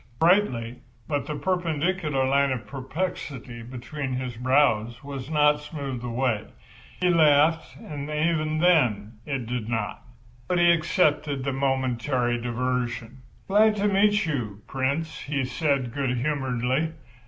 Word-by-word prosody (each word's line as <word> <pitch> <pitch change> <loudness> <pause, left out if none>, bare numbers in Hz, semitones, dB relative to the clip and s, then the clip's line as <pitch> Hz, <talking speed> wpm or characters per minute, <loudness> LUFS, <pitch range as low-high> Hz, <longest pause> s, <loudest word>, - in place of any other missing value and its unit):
Brightly, 160 - +2 0.3
but 145 -2 -2
the 150 - -3
perpendicular 165 -4 0
line 140 0 +3
of 125 -3 -3
perplexity 135 -4 -5
between 130 +3 -5
his 125 -1 -3
brows 125 -1 +2
was 140 -1 -6
not 150 -1 +4
smoothed 140 -5 -6
away. 120 -2 -1 0.5
He 180 - +2
laughed, 160 0 +3
and 145 -1 -7
even 155 0 0
then 120 - +2
it 135 -5 -2
did 120 -1 -3
not. 115 -3 -2 0.5
But 180 - +1
he 175 0 +6
accepted 155 -4 +1
the 140 0 -1
momentary 130 -2 0
diversion. 125 0 -2 0.3
"Glad 210 +2 +4
to 205 0 +1
meet 205 0 +3
you, 110 -10 -3
Prince," 140 +5 -2
he 135 -2 -2
said, 135 -3 0
good 130 -3 -1
humouredly. 130 +2 0
140 Hz, 130 wpm, -25 LUFS, 125-155 Hz, 0.5 s, he